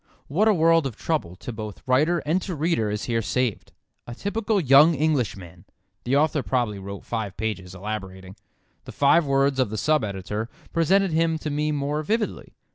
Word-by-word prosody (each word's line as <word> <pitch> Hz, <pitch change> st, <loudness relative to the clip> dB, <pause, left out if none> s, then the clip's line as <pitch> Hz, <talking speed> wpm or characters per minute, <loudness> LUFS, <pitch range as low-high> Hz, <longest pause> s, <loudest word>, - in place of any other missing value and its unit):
What 195 Hz, +10 st, +2 dB
a 215 Hz, -, +5 dB
world 165 Hz, -2 st, +4 dB
of 120 Hz, -, -8 dB
trouble 130 Hz, -, -2 dB
to 120 Hz, -, -8 dB
both 110 Hz, -2 st, -8 dB
writer 150 Hz, +6 st, +2 dB
and 165 Hz, +5 st, +1 dB
to 180 Hz, -2 st, -4 dB
reader 150 Hz, -8 st, 0 dB
is 105 Hz, +1 st, -3 dB
here 115 Hz, -1 st, 0 dB
saved. 125 Hz, 0 st, -2 dB, 0.4 s
"A 120 Hz, -, -7 dB
typical 205 Hz, -, -1 dB
young 150 Hz, +1 st, +6 dB
Englishman!" 110 Hz, -, -2 dB, 0.4 s
The 130 Hz, +3 st, +1 dB
author 150 Hz, 0 st, +2 dB
probably 120 Hz, -6 st, -1 dB
wrote 100 Hz, 0 st, -8 dB
five 110 Hz, -5 st, -4 dB
pages, 95 Hz, -4 st, -4 dB
elaborating. 95 Hz, -2 st, -6 dB, 0.5 s
The -, -, -9 dB
five 145 Hz, +3 st, +4 dB
words 135 Hz, 0 st, +2 dB
of 130 Hz, -5 st, +2 dB
the 110 Hz, -, -4 dB
sub 155 Hz, +4 st, +2 dB
editor 105 Hz, +2 st, -4 dB, 0.2 s
present 185 Hz, +3 st, +3 dB
him 165 Hz, 0 st, +2 dB
to 155 Hz, -1 st, -4 dB
me 150 Hz, +1 st, 0 dB
more 145 Hz, +1 st, -1 dB
vividly. 215 Hz, +7 st, -2 dB
135 Hz, 180 wpm, -24 LUFS, 105-160 Hz, 0.5 s, young